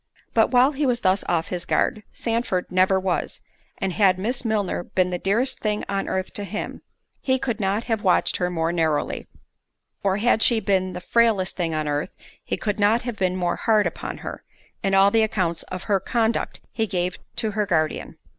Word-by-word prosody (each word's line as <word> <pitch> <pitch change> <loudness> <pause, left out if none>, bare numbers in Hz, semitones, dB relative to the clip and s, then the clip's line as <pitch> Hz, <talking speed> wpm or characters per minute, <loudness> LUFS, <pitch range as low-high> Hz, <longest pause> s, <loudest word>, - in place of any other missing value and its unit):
But - - +4
while 255 +2 +5
he 290 0 -1
was 245 -1 +1
thus 190 +1 +2
off 165 -2 0
his 180 -2 -3
guard, 215 - +1
Sandford 230 -7 -2
never 185 +1 +3
was—and 185 0 -4
had 190 -3 +4
Miss 230 +8 -2
Milner 210 -6 0
been 180 0 0
the 180 - -2
dearest 230 +9 +1
thing 210 -1 -1
on 195 0 -2
earth 190 0 -2
to 205 - -4
him, 210 +2 -5 0.4
he 260 -1 +1
could 240 -3 -3
not 200 +2 0
have 225 -3 -1
watched 185 - +3
her 180 -1 0
more 165 -1 0
narrowly; 160 -3 0 0.7
or 195 -1 +1
had 225 +1 +2
she 235 -1 +5
been 190 -3 0
the - - -6
frailest 220 -4 +2
thing 165 -3 -1
on 155 -1 -1
earth, 145 +4 -2 0.3
he - - -2
could 210 -1 -2
not 215 +3 +3
have 240 -3 -4
been 185 -1 +1
more 175 -1 -1
hard 215 -2 +3
upon - - -4
her, - - -6 0.4
in 195 0 +1
all 195 +1 +6
the 225 - +4
accounts 185 -6 0
of 185 0 -5
her 200 -3 +1
conduct 230 +2 -1
he 225 -1 -1
gave 180 -2 -2 0.2
to 220 - -1
her 210 0 -1
guardian. 155 -4 -1
195 Hz, 195 wpm, -23 LUFS, 180-225 Hz, 0.7 s, all